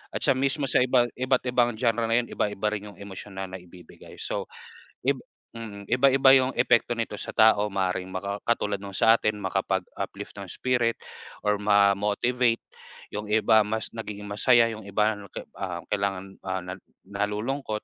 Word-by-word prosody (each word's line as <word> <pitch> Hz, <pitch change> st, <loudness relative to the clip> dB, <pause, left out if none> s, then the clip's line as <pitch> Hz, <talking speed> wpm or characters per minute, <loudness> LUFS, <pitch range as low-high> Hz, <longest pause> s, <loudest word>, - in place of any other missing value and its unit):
at -, -, 0 dB
siya -, -, +4 dB
mismo 140 Hz, +2 st, 0 dB
sa -, -, +3 dB
iba, 125 Hz, -1 st, +3 dB
iba't 130 Hz, 0 st, +1 dB
ibang 120 Hz, -1 st, +2 dB
genre 115 Hz, -1 st, +1 dB
na 115 Hz, +1 st, +3 dB
yun -, -, -11 dB
iba-iba 105 Hz, 0 st, -1 dB
rin 105 Hz, 0 st, -5 dB
yung -, -, -18 dB
emosyonal 95 Hz, -1 st, -7 dB
naibibigay, 90 Hz, -2 st, -12 dB
so, -, -, -3 dB, 0.6 s
ib 135 Hz, -1 st, +2 dB, 0.4 s
mm. 100 Hz, -3 st, -8 dB
Iba-iba 135 Hz, +2 st, +5 dB
yung 130 Hz, 0 st, +2 dB
epekto 120 Hz, +1 st, +3 dB
nito 115 Hz, -2 st, -3 dB
sa -, -, -6 dB
tao 105 Hz, -1 st, +5 dB
maaring 95 Hz, -1 st, -1 dB
maka 100 Hz, +2 st, -4 dB
katulad 105 Hz, -4 st, 0 dB
nung 100 Hz, -, -7 dB
sa 115 Hz, -, +6 dB
atin, 105 Hz, -1 st, -1 dB
makapag-uplift 95 Hz, +1 st, -3 dB
ng 100 Hz, -3 st, -8 dB
spirit 120 Hz, -2 st, 0 dB, 0.5 s
or 105 Hz, 0 st, +2 dB
ma-motivate. 105 Hz, +4 st, +2 dB, 0.5 s
Yung 105 Hz, 0 st, -5 dB
iba 110 Hz, 0 st, +5 dB
mas 110 Hz, +1 st, -3 dB
nagiging 105 Hz, -2 st, -6 dB
masaya, 115 Hz, +3 st, +4 dB
yung 110 Hz, -, -8 dB
iba 105 Hz, +2 st, +1 dB
'no 100 Hz, -1 st, -11 dB
ke -, -, -8 dB
ah, 90 Hz, -3 st, -4 dB
kailangan, 95 Hz, -1 st, -2 dB
ah, 95 Hz, 0 st, -1 dB
na 90 Hz, -, -5 dB, 0.3 s
nalulungkot 105 Hz, +4 st, -3 dB
105 Hz, 165 wpm, -26 LUFS, 100-120 Hz, 0.6 s, sa